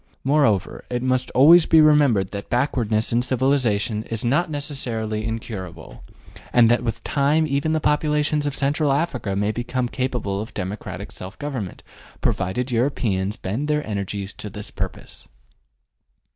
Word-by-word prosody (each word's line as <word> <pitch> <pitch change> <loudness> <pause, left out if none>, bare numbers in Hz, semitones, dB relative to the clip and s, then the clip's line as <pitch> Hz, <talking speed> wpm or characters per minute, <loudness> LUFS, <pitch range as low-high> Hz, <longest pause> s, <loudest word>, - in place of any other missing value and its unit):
Moreover, 135 -9 +1
it 125 0 -2
must 130 0 +1
always 160 +6 +7
be 160 - +6
remembered 145 -11 +4
that 100 -1 -6
backwardness 120 -4 0
in 120 - +3
civilization 125 -5 +1
is 115 0 -4
not 145 +8 +2
necessarily 120 -7 -3
incurable, 110 -5 -6 0.5
and 120 -1 +5
that 120 0 +2
with 115 -2 -3
time 145 +3 +2
even 140 +2 0
the 160 - +2
populations 150 0 +1
of 145 - -2
Central 145 +1 +1
Africa 135 - -1
may 100 +2 +1
become 120 +2 -2
capable 120 -6 -2
of 110 - -9
democratic 95 +3 -5
self 95 +1 -8
government, 130 -10 -5 0.4
provided 110 +7 -1
Europeans 110 -6 0
bend 115 +11 -3
their 150 0 0
energies 100 -1 -4
to 105 - -6
this 105 +1 -7
purpose. - - -6
125 Hz, 145 wpm, -22 LUFS, 105-145 Hz, 0.5 s, always